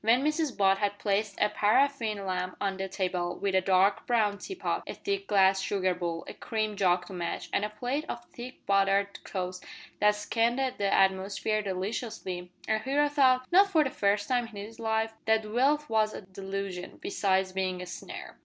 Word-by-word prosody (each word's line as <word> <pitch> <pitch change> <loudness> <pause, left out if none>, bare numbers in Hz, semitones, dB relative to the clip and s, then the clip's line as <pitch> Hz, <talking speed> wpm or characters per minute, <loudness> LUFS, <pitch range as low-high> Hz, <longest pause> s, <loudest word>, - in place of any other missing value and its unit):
When 235 +4 +4
Mrs 305 -2 0
Butt 195 -1 +4
had 205 -1 0
placed 205 0 -1
a 210 - +4
paraffin 215 -2 +1
lamp 185 -1 -2
on 195 -1 -1
the 190 0 -3
table, 180 -2 -2
with 200 -1 -1
a 190 - +4
dark 190 +2 +3
brown 215 -4 +2
teapot, 385 0 -3
a - - -5
thick 395 0 -3
glass 190 -1 +4
sugar 185 -2 0
bowl, 170 -2 -4
a - - -6
cream 215 -2 -2
jug 180 -2 +2
to - - -10
match, 175 -2 -4
and - - +1
a 210 - -1
plate 245 +8 -3
of 240 0 -5
thick 245 +2 -10
buttered 195 0 +2
toast 185 -1 -4 0.4
that 210 0 +4
scented 240 +5 0
the 200 -1 +1
atmosphere 195 +3 +2
deliciously, 190 -2 -4 0.2
our 220 0 +2
hero 285 +5 +1
thought 260 -3 +4
not 395 +3 +6
for 320 -5 +4
the 265 - -2
first 205 0 +1
time 245 -2 +1
in 225 - -14
his 210 +3 -8
life 220 0 0
that 220 -1 +2
wealth 275 +7 +2
was 215 -1 +1
a - - -6
delusion, 190 -1 -6
besides 190 - 0
being 185 -1 -2
a 180 - -5
snare. 180 - -8
205 Hz, 190 wpm, -29 LUFS, 190-235 Hz, 0.4 s, not